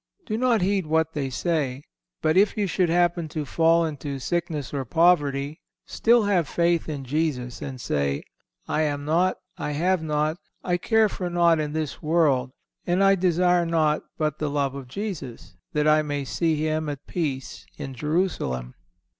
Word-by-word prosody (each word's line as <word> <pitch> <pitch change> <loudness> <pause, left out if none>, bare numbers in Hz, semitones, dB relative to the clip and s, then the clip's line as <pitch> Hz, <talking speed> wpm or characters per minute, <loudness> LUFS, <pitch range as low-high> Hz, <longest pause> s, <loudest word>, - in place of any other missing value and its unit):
Do 215 - -2
not 235 -4 +2
heed 195 -3 +1
what 160 0 +1
they 140 -3 -2
say, 140 -2 -1 0.4
but 155 +1 +3
if 200 +3 +4
you 210 - +1
should 180 -1 +1
happen 175 -1 +2
to 155 0 -4
fall 165 +3 +3
into 145 -2 -4
sickness 155 -1 -3
or 140 -2 -1
poverty, 145 -1 +2 0.3
still 235 0 +3
have 185 -6 +2
faith 170 0 +1
in 140 -3 -5
Jesus, 130 -4 -2
and 130 -2 -6
say, 70 - -1 0.4
"I 155 - 0
am 145 -2 -1
naught, 175 +5 +2 0.2
I 150 -3 -2
have 180 +4 +1
naught, 155 +1 0 0.3
I 180 -1 +1
care 220 +4 +3
for 185 -3 -4
naught 170 -2 +3
in 150 -1 -2
this 155 -3 -3
world, 150 -5 +2 0.4
and 180 +3 +2
I 195 0 +6
desire 180 -1 +3
naught 160 -2 +1 0.2
but 155 -2 -1
the 150 - -1
love 140 -2 0
of 140 -2 -8
Jesus, 150 - -6 0.2
that 150 0 +1
I 155 0 +5
may 145 -2 -3
see 165 +4 0
Him 155 0 -1
at 145 -1 -6
peace 140 -7 -4
in 140 -3 -6
Jerusalem." 150 - -1
155 Hz, 170 wpm, -25 LUFS, 145-175 Hz, 0.4 s, I